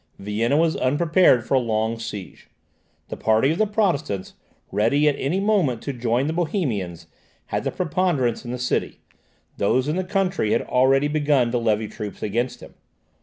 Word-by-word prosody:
Vienna 110 +7 0
was 165 0 +2
unprepared 145 -2 +3
for - - -2
a 135 - +5
long 110 -1 -1
siege. 105 -4 -8 0.6
The - - -4
party 110 +6 +2
of 165 - -2
the 215 - +3
Protestants, 165 - -1 0.4
ready 145 +8 +2
at 145 - +3
any 160 +8 0
moment 195 - +1
to 140 - -3
join 120 +1 0
the 155 - -1
Bohemians, 125 - -2 0.4
had - - -3
the - - +1
preponderance 160 -9 0
in 120 - -8
the 125 - -3
city; 125 0 -2 0.6
those 130 +7 +1
in 155 +4 -1
the 185 - 0
country 185 - 0
had - - +1
already 135 +3 +3
begun 145 -5 +1
to 120 - 0
levy 110 -2 0
troops 105 0 -7
against 120 +5 -2
him. - - -12
130 Hz, 170 wpm, -23 LUFS, 115-160 Hz, 0.6 s, a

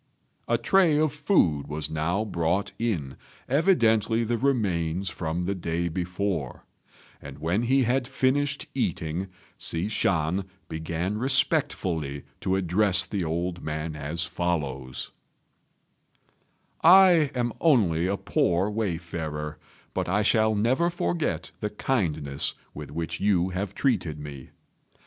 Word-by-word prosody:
A - - +2
tray 180 -6 +4
of 155 -2 +2
food 90 - +2
was 75 0 -3
now 85 +7 0
brought 85 0 0
in, 85 - -2 0.3
evidently 115 - +3
the 115 +1 0
remains 95 -9 0
from 80 +1 -3
the 100 - 0
day 85 -2 -2
before; 90 -4 -3 0.6
and - - -9
when 85 +7 0
he 130 +3 +3
had 125 +1 +1
finished 140 +2 0
eating, 80 +4 -2 0.3
Hsi 85 +5 -1
Shan 90 -2 0 0.2
began 85 +6 -3
respectfully 105 - +1 0.2
to 95 - 0
address 95 +1 +2
the 100 -3 -2
old 85 +2 -2
man 75 +1 -4
as 75 +4 -3
follows: 75 -7 -3 1.7
"I 175 -3 +7
am 120 -2 0
only 95 - +3
a 100 +1 0
poor 90 +3 +1
wayfarer, 80 -7 -3 0.3
but - - -2
I 105 +3 +2
shall 110 0 +3
never 130 +11 +2
forget 170 -2 -2
the 105 - -2
kindness 80 - -1 0.2
with 75 -2 -8
which 80 +3 -4
you 95 -3 +2
have 95 +2 -4
treated 90 - 0
me. 70 -3 -9
90 Hz, 120 wpm, -26 LUFS, 80-115 Hz, 1.7 s, I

